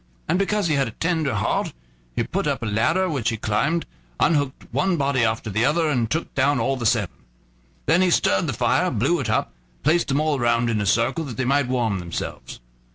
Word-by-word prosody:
And 180 - +1
because 205 0 0
he 160 - +1
had 135 -3 +1
a 115 - -9
tender 160 -5 0
heart, - - -1 0.4
he - - +1
put - - -2
up 140 -4 -1
a - - -2
ladder, 120 - +1
which 135 -9 -1
he 110 - -2
climbed 135 +11 0 0.3
unhooked 145 -4 +1
one 155 +8 +1
body 140 -4 +1
after 110 -1 -1
the 110 +4 +1
other, 155 +4 +2
and 120 -6 0
took 160 +6 -2
down 140 +1 +2
all 135 - +1
the 120 -3 -1
seven. 105 -5 0 0.7
Then 165 +4 +3
he 185 - +3
stirred 100 - +2
the - - -1
fire, - - +1
blew 145 +11 +1
it 125 -5 -3
up, 110 - 0 0.2
and - - -36
placed 160 +5 +2
them 140 +1 +1
all 155 -2 +1
round 120 0 +2
in 110 -2 0
a 100 - -1
circle, 120 - +1
that 120 -6 -7
they 130 - -1
might 140 0 +2
warm 120 -6 0
themselves. 85 -1 -6
135 Hz, 225 wpm, -23 LUFS, 115-155 Hz, 0.7 s, Then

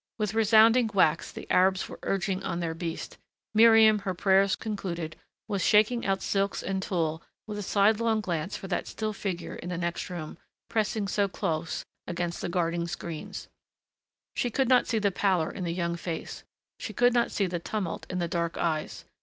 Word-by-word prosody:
With 210 -2 -1
resounding 225 +2 +5
whacks 175 -6 +2
the - - -9
Arabs 185 +1 +3
were - - -10
urging 195 -1 -1
on 170 -3 -3
their 165 -2 -2
beast; 165 0 -5 0.3
Miriam, 220 -1 +7
her 195 -2 -3
prayers 195 +1 +3
concluded, 175 -7 -4 0.3
was 200 -4 -1
shaking 215 +2 +3
out 195 0 0
silks 200 0 0
and 190 0 -2
tulle 165 -4 -1 0.2
with 210 -1 -5
a - - -3
sidelong 215 +3 +2
glance 175 -2 -3
for 195 - -8
that 180 - -2
still 215 -1 -3
figure 190 -4 -4
in 175 - -7
the 180 - -3
next 170 0 -3
room, 170 -4 -6 0.3
pressing 215 -2 0
so 200 0 +1
close 160 -3 -3 0.2
against 175 -1 -3
the - - -3
guarding 170 -1 0
screens. 170 -2 -6 0.9
She 245 - 0
could 265 +2 +1
not 255 -1 +5
see 230 - 0
the 205 -2 +2
pallor 185 -4 +1
in 185 - -5
the 170 - -1
young 170 0 -1
face. 170 -1 -5 0.4
She 215 - -5
could 245 +3 +4
not 240 -1 +2
see 200 - 0
the 175 -1 -2
tumult 190 0 -4
in 180 - -3
the 175 -1 0
dark 170 0 -2
eyes. 155 -2 -2
190 Hz, 185 wpm, -28 LUFS, 170-215 Hz, 0.9 s, Miriam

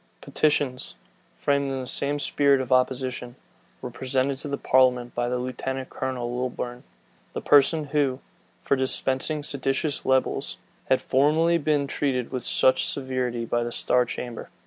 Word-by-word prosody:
Petitions, 145 -4 0 0.4
framed 140 -1 0
in 135 -1 -3
the 130 - -5
same 140 +3 0
spirit 140 -1 +2
of 130 -1 -5
opposition, 125 -1 0 0.5
were 125 - -5
presented 130 +2 -1
to 145 - -7
the 140 0 -3
parliament 125 -2 +2
by 120 0 -1
Lieutenant 130 +1 -4
Colonel 125 -2 -4
Lilburn, 125 -1 -4 0.5
the - - -3
person 145 +2 +4
who, 135 -3 +1 0.4
for - - 0
dispersing 130 +3 0
seditious 140 +1 0
libels, 130 0 0 0.3
had 130 - +3
formerly 155 +5 +2
been 150 -2 +1
treated 130 -3 -2
with 130 -2 -3
such 130 0 +4
severity 130 -3 -2
by 120 +1 -1
the 120 - -4
star 125 +1 +2
chamber. 120 -1 -7
130 Hz, 145 wpm, -25 LUFS, 125-140 Hz, 0.5 s, person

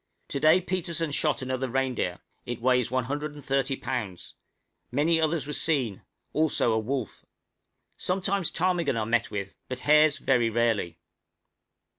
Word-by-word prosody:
To 140 - -2
day 155 +5 +5
Petersen 170 -3 -2
shot 150 -1 0
another 130 0 -2
reindeer; 125 -8 -1 0.2
it 120 -1 -5
weighs 125 0 +2
130 135 +1 -1
lbs.; 110 -9 -4 0.6
many 160 +5 +2
others 160 -2 +1
were 150 - -5
seen, 130 - +1 0.3
also 155 -6 +2
a 110 - +2
wolf. 125 +1 -4 0.7
Sometimes 190 -1 0
a - - -15
few - - -17
ptarmigan 175 -7 +1
are 110 - -1
met 120 0 +1
with, 100 -1 -5
but 130 0 -4
hares 150 0 +5
very 120 -4 +2
rarely. 110 -7 0
135 Hz, 140 wpm, -27 LUFS, 120-155 Hz, 0.7 s, day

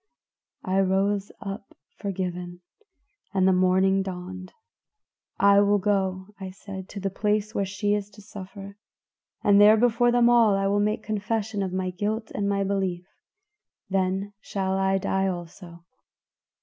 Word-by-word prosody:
"I 190 +1 +1
rose 195 +1 +1
up 195 0 -7 0.2
forgiven, 180 -3 -4 0.7
and 190 -1 +3
the 190 - +5
morning 190 +1 +3
dawned. 185 0 -7 0.9
'I 200 0 +5
will 205 0 +4
go,' 190 -1 -1
I 190 -1 -6
said, 190 0 -9
'to 205 - -7
the 195 0 -2
place 210 +1 -1
where 195 - -1
she 205 +1 -1
is 205 -1 -2
to 210 - -13
suffer, 200 0 -10 0.7
and 205 0 +5
there 210 +1 +8
before 240 +1 +3
them 240 0 +4
all 230 -4 +5
I 195 - 0
will 200 +1 +2
make 210 +1 0
confession 215 0 -2
of 190 -2 -2
my 185 0 -2
guilt 215 +4 -3
and 200 0 -1
my 200 0 +1
belief; 190 -3 -2 0.9
then 195 +1 0
shall 190 -1 -2
I 195 0 +2
die 195 0 0
also. 175 -1 -7
195 Hz, 150 wpm, -25 LUFS, 185-205 Hz, 0.9 s, there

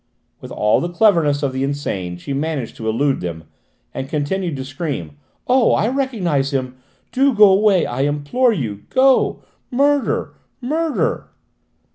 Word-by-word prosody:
With - - -10
all 105 0 +2
the 175 - -2
cleverness 170 -7 +2
of 135 -2 -1
the 130 +1 -2
insane 100 -11 -3
she 140 +11 -6
managed 140 -4 -3
to 110 -1 -3
elude 135 +5 +1
them, 85 -2 -5 0.5
and 135 0 -5
continued 160 +3 -2
to 130 -1 -5
scream. 135 - -5 0.3
"Oh, 250 -1 +4
I 220 - +1
recognised 185 - -1
him! 130 -1 -3 0.3
Do 270 -1 +2
go 205 -2 +7
away, 195 -3 +3
I 125 +2 -3
implore 145 - +1
you! 110 - -4
Go! 265 0 +3 0.3
Murder! 280 +2 +1 0.3
Murder!" 310 +5 -1
150 Hz, 145 wpm, -19 LUFS, 135-225 Hz, 0.5 s, go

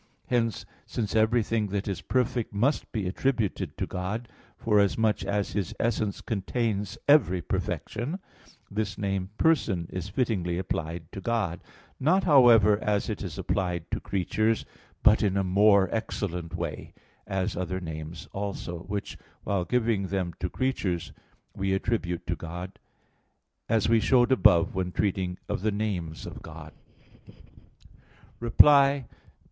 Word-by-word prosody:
Hence, 115 -3 0 0.2
since 110 -3 -3
everything 110 -1 +2
that 100 +1 -3
is 100 -3 -3
perfect 125 -3 0
must 130 +9 +1
be 105 -5 -2
attributed 115 +1 -1
to - - -1
God, 105 +6 -4 0.3
forasmuch 105 0 +2
as 100 0 -1
His 95 -1 -2
essence 110 -3 -1
contains 105 -1 -2
every 140 -11 +5
perfection, 120 - -3 0.5
this 105 0 -2
name 95 -2 -2
"person" 110 - +2
is 95 +1 -4
fittingly 100 -7 -1
applied 85 -2 -4
to 100 - -7
God; 105 -8 -1 0.4
not, 180 +8 +3
however, 115 - +6
as 105 -1 0
it - - -5
is - - -5
applied 90 -3 -2
to - - -1
creatures, 110 +4 0 0.4
but 105 - +6
in 100 -2 +1
a 100 - +2
more 100 +1 +5
excellent 90 -6 -3
way; 85 -3 -5 0.3
as 95 -2 -1
other 90 +1 -2
names 80 -2 -7
also, 100 -4 -4
which, 100 +3 -5 0.2
while 95 -3 0
giving 115 -5 +1
them 95 -2 -2
to 90 - -2
creatures, 100 -10 -2 0.4
we 95 0 0
attribute 95 -5 -2
to 85 - -1
God; 90 +3 -7 0.9
as 110 -2 +2
we 115 +1 +4
showed 120 +3 +3
above 90 -8 +5
when 95 -2 -2
treating 95 -2 -1
of - - -2
the 110 +1 +1
names 95 -6 -3
of - - -8
God 80 -1 -10 0.5
(Q. - - -16 1.1
13, 115 - +8
A. 140 -1 +5
2). - - -17
100 Hz, 140 wpm, -27 LUFS, 90-115 Hz, 1.1 s, 13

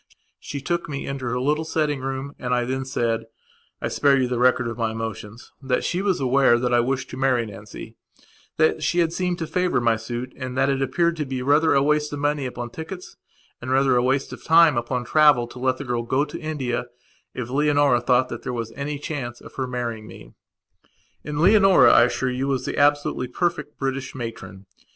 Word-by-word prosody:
She 140 - -6
took 170 +4 -2
me 140 -1 -4
into 135 -2 -5
her 125 +1 -1
little 150 +4 0
sitting 155 -3 -1
room 135 +1 -4
and 125 0 -1
I 120 0 0
then 130 +1 -3
saidI 115 -3 -1 0.6
spare 140 -1 +3
you 130 - +1
the 125 -1 -2
record 125 0 +3
of 115 - -4
my 115 -1 -1
emotionsthat 115 +4 -5
she 180 - -1
was 195 -2 0
aware 130 -2 +4
that 125 0 -1
I 120 - +5
wished 130 +2 -1
to 130 - -7
marry 130 -3 +1
Nancy; 105 0 -10 0.6
that 155 0 +2
she 175 - 0
had 165 -1 +2
seemed 180 -1 -1
to 165 - -3
favour 180 0 0
my 115 -2 +2
suit 120 +3 -6
and 130 -1 -6
that 135 +1 +3
it 135 -1 0
appeared 170 +4 +1
to 150 - -2
be 130 -1 -3
rather 150 +4 +3
a 135 - +4
waste 150 0 +1
of - - -3
money 145 -1 -1
upon 120 -1 -6
tickets 175 +5 -8 0.5
and - - -6
rather 135 0 +3
a 120 - +3
waste 135 +2 0
of - - -10
time 165 -2 +6
upon 120 +1 -2
travel 150 -2 +4
to 120 +1 -12
let 130 0 0
the 140 - -7
girl 120 -1 -1
go 130 +5 0
to - - -8
India 125 -6 -3 0.5
if 125 -1 -5
Leonora 145 -2 +3
thought 130 0 +2
that - - -6
there 125 - -4
was 115 -2 -4
any 145 +3 -4
chance 135 -5 -5
of - - -13
her 130 -1 -3
marrying 120 -3 -4
me. - - -13 0.9
And 150 0 -4
Leonora, 195 +1 +6
I 120 - +7
assure 130 +1 -1
you, 130 +2 -2
was 135 -2 -1
the - - -3
absolutely 145 -3 +2
perfect 160 +2 -2
British 135 0 -3
matron. 100 -6 -7
130 Hz, 210 wpm, -23 LUFS, 120-150 Hz, 0.9 s, I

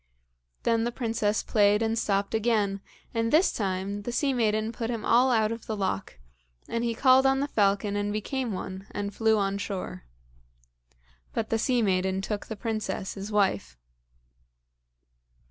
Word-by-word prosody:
Then 230 -1 +2
the 240 - -1
princess 225 -3 -1
played 210 0 +3
and 225 0 0
stopped 200 -2 0
again, 210 -3 +1 0.3
and 230 -1 0
this 325 +5 +4
time 195 0 -2
the 240 - -4
sea 275 +3 +1
maiden 220 -2 +1
put 230 -1 -4
him 230 -3 -3
all 245 +3 +5
out 220 -3 +2
of 230 0 -6
the 220 - -3
loch, 100 - -2 0.5
and 230 0 -2
he 235 -1 -1
called 260 +2 +5
on 270 0 +3
the 285 - 0
falcon 205 -3 +1
and 205 0 -1
became 240 +4 -2
one 190 0 -6
and 205 0 -4
flew 220 0 +3
on 200 0 0
shore. 190 - -5 1.3
But 225 - -2
the 225 - +2
sea 245 0 +2
maiden 190 -1 +1
took 205 +1 -4
the 220 - -5
princess, 215 -3 -3
his 200 +2 -7
wife. 105 - +1
215 Hz, 165 wpm, -27 LUFS, 200-230 Hz, 1.3 s, all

